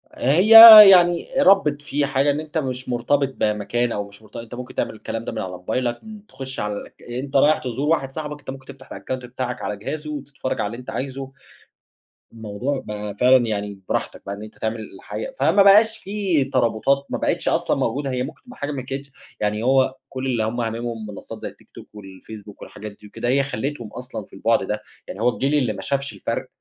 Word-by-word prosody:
هي 165 Hz, -, +2 dB, 0.4 s
يعني 175 Hz, -2 st, +5 dB
ربِّت 195 Hz, -, +4 dB
فيه 145 Hz, 0 st, -1 dB
حاجة، 140 Hz, +1 st, +1 dB
إن 145 Hz, -, -2 dB
أنت 155 Hz, +1 st, -6 dB
مش 130 Hz, -3 st, -3 dB
مرتبط 135 Hz, +3 st, 0 dB
بمكان، 110 Hz, +3 st, -1 dB
أو 105 Hz, -2 st, -3 dB
مش 100 Hz, +1 st, -17 dB
مرت 110 Hz, -, -20 dB
أنت 115 Hz, 0 st, -8 dB
ممكن 125 Hz, +1 st, -9 dB
تعمل -, -, -2 dB
الكلام 115 Hz, +1 st, -6 dB
ده -, -, -4 dB
من 110 Hz, -, -5 dB
على 95 Hz, -, -4 dB
موبايلك، 120 Hz, +7 st, -3 dB
م 215 Hz, -1 st, -10 dB
تخُش 130 Hz, 0 st, -7 dB
على 105 Hz, 0 st, -2 dB
الأك 100 Hz, -, -10 dB
أنت 130 Hz, +3 st, -6 dB
رايح 150 Hz, +3 st, +5 dB
تزور 130 Hz, +4 st, -3 dB
واحد 135 Hz, -5 st, 0 dB
صاحبك، 150 Hz, 0 st, -6 dB
أنت -, -, -12 dB
ممكن 130 Hz, 0 st, -8 dB
تفتَح 135 Hz, -1 st, -14 dB
الأكاونت 130 Hz, -1 st, -6 dB
بتاعك 125 Hz, 0 st, -5 dB
على 105 Hz, -, -4 dB
جهازه، 150 Hz, +8 st, -6 dB
وتتفرّج 140 Hz, -2 st, -5 dB
على 105 Hz, -, -1 dB
اللي 115 Hz, +3 st, -7 dB
أنت 125 Hz, -, -10 dB
عايزه. 135 Hz, 0 st, -5 dB, 1.0 s
الموضوع 115 Hz, +5 st, -4 dB
بقى 105 Hz, -1 st, -6 dB
فعلًا 125 Hz, +1 st, +4 dB
يعني 100 Hz, -2 st, -4 dB
براحتك -, -, -3 dB
بقى 100 Hz, -, -5 dB
إن 105 Hz, -, -10 dB
أنت 110 Hz, -, -12 dB
تعمل 110 Hz, +1 st, -3 dB, 0.2 s
الحاجة، -, -, -7 dB
فما 200 Hz, -, +4 dB
بقاش 220 Hz, +3 st, +6 dB
فيه 195 Hz, -9 st, -1 dB
ترابُطات، 130 Hz, +3 st, +1 dB
ما -, -, -2 dB
بقِتش -, -, -1 dB
أصلًا -, -, 0 dB
موجودة، 140 Hz, 0 st, -2 dB
هي 125 Hz, 0 st, -2 dB
ممكن 135 Hz, -, -9 dB
تبقى 250 Hz, -1 st, -14 dB
حاجة 145 Hz, +1 st, -4 dB
ما 135 Hz, -2 st, -4 dB
كانتش 135 Hz, +2 st, -7 dB, 0.3 s
يعني 105 Hz, +1 st, -1 dB
هو 130 Hz, 0 st, +2 dB
كُل 130 Hz, 0 st, -5 dB
اللي 120 Hz, -4 st, 0 dB
هُم 115 Hz, +3 st, -2 dB
هامِمهم 115 Hz, -1 st, -4 dB
منصات 105 Hz, -, -9 dB
زي -, -, -4 dB
التيك -, -, -15 dB
توك، -, -, -12 dB
والفيسبوك 105 Hz, +1 st, -12 dB
والحاجات 105 Hz, +1 st, -9 dB
دي 105 Hz, +1 st, -16 dB
وكده، 120 Hz, -, -5 dB
هي 140 Hz, +2 st, +2 dB
خلِّيتهم 135 Hz, -3 st, -5 dB
أصلًا 125 Hz, -5 st, -7 dB
في -, -, -28 dB
البُعْد -, -, +1 dB
ده، -, -, -3 dB, 0.3 s
يعني 100 Hz, -, -8 dB
هو 120 Hz, -, +4 dB
الجيل 135 Hz, +4 st, -1 dB
اللي 125 Hz, -7 st, +1 dB
ما 95 Hz, -, -8 dB
شافش 140 Hz, +3 st, -3 dB
الفرق -, -, -4 dB
130 Hz, 210 wpm, -21 LUFS, 110-140 Hz, 1.0 s, بقاش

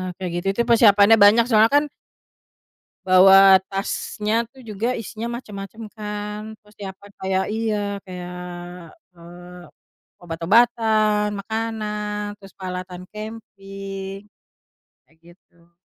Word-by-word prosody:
kayak 185 Hz, -1 st, -5 dB
gitu 175 Hz, +2 st, -3 dB
itu 235 Hz, -, +1 dB
persiapannya 220 Hz, -2 st, +6 dB
banyak 220 Hz, +3 st, +7 dB
soalnya 220 Hz, +2 st, +5 dB
kan 290 Hz, -, +5 dB, 1.2 s
bawa 190 Hz, +1 st, +8 dB
tasnya 210 Hz, +3 st, -2 dB
tuh 265 Hz, +1 st, -17 dB
juga 230 Hz, +3 st, -2 dB
isinya 225 Hz, +1 st, -6 dB
macam-macam 210 Hz, -2 st, -9 dB
kan, 210 Hz, -1 st, -6 dB, 0.2 s
persiapan 200 Hz, -1 st, -11 dB
kayak 190 Hz, 0 st, 0 dB
iya 220 Hz, -1 st, -1 dB, 0.3 s
kayak, 180 Hz, -1 st, -7 dB, 0.7 s
eee, 175 Hz, +1 st, -13 dB, 0.6 s
obat-obatan, 215 Hz, +4 st, +2 dB
makanan, 210 Hz, -1 st, -4 dB
terus 195 Hz, -1 st, -15 dB
peralatan 180 Hz, -1 st, -7 dB
camping, 195 Hz, -3 st, -8 dB, 0.9 s
kayak 160 Hz, -, -30 dB
gitu. 170 Hz, -1 st, -23 dB
205 Hz, 100 wpm, -22 LUFS, 190-220 Hz, 1.2 s, bawa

